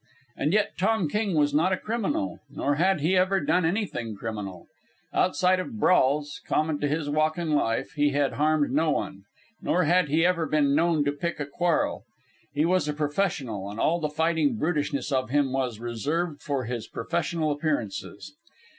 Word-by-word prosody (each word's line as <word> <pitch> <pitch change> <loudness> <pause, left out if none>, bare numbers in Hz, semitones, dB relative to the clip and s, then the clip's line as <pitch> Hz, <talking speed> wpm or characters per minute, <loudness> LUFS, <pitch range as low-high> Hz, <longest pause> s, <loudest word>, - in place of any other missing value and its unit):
And 150 - 0
yet 210 +1 +1
Tom 195 -2 +2
King 205 +2 -1
was 145 -1 +2
not 165 +6 +3
a 185 - +2
criminal, 235 +9 -2
nor 140 +1 -1
had 175 +2 +2
he 170 +6 +2
ever 185 +1 +3
done 175 +3 +1
anything 165 - -2
criminal. 100 -5 -6 0.5
Outside 185 +5 +2
of 220 +4 -5
brawls, 145 -5 +2
common 155 -1 0
to 145 - 0
his 150 +1 -1
walk 155 +2 +1
in 170 -2 -2
life, 115 -6 0
he 145 -1 +2
had 140 -1 0
harmed 150 -1 +2
no 155 +4 +2
one. 100 -8 -2 0.4
Nor 180 - +1
had 175 0 +3
he 160 +3 +3
ever 175 -3 +1
been 145 -2 +2
known 160 -1 +2
to 145 - +2
pick 160 +3 -4
a 145 - -2
quarrel. 170 +4 0 0.5
He 145 +2 +1
was 180 -2 +2
a 150 - -1
professional, 145 - -2
and 105 +2 -7
all 170 +2 +2
the 155 -2 -1
fighting 155 -4 +1
brutishness 150 -1 -1
of 130 -4 0
him 140 -1 +1
was 125 -5 -1
reserved 145 +8 -2
for 140 -3 -2
his 120 -1 -4
professional 165 +2 -1
appearances. 145 - -3
150 Hz, 180 wpm, -26 LUFS, 140-175 Hz, 0.5 s, not